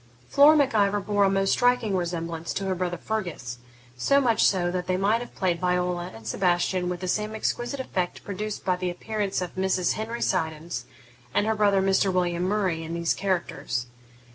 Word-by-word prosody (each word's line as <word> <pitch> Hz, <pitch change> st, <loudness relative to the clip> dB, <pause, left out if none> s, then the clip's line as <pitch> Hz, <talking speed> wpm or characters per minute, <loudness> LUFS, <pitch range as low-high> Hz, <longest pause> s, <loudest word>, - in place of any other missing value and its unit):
Flora 295 Hz, -, +7 dB
Mac 280 Hz, -4 st, +2 dB
Ivor 205 Hz, -1 st, +3 dB
bore 205 Hz, 0 st, +2 dB
a -, -, +4 dB
most 195 Hz, 0 st, +1 dB
striking 245 Hz, -5 st, +2 dB
resemblance 170 Hz, -2 st, -3 dB
to 195 Hz, -, -2 dB
her 190 Hz, -, 0 dB
brother 175 Hz, -1 st, -2 dB
Fergus; 170 Hz, -, -4 dB, 0.4 s
so 275 Hz, -, +3 dB
much 240 Hz, -5 st, +3 dB
so 175 Hz, -3 st, +3 dB
that 180 Hz, 0 st, -3 dB
they 185 Hz, 0 st, +1 dB
might 210 Hz, +5 st, +2 dB
have 245 Hz, -, -9 dB
played 180 Hz, -3 st, 0 dB
Viola 180 Hz, -1 st, 0 dB
and 110 Hz, 0 st, -12 dB
Sebastian 180 Hz, -, +1 dB
with 180 Hz, 0 st, -4 dB
the 185 Hz, -, -3 dB
same 210 Hz, +3 st, -1 dB
exquisite 240 Hz, +5 st, -2 dB
effect 185 Hz, -8 st, -3 dB
produced 205 Hz, +1 st, -5 dB
by 185 Hz, -, +2 dB
the 180 Hz, 0 st, -2 dB
appearance 200 Hz, +1 st, -2 dB
of 180 Hz, -, -6 dB
Mrs. 190 Hz, -1 st, +1 dB
Henry 230 Hz, +2 st, -3 dB
Siddons 160 Hz, -2 st, -2 dB, 0.5 s
and 205 Hz, -, +3 dB
her 220 Hz, -, +2 dB
brother, 205 Hz, -2 st, +3 dB
Mr. 195 Hz, 0 st, +3 dB
William 175 Hz, -1 st, 0 dB
Murray, 190 Hz, -4 st, 0 dB
in 165 Hz, +1 st, -5 dB
these 170 Hz, -1 st, +1 dB
characters. 175 Hz, -10 st, -2 dB
185 Hz, 190 wpm, -26 LUFS, 175-210 Hz, 0.5 s, Flora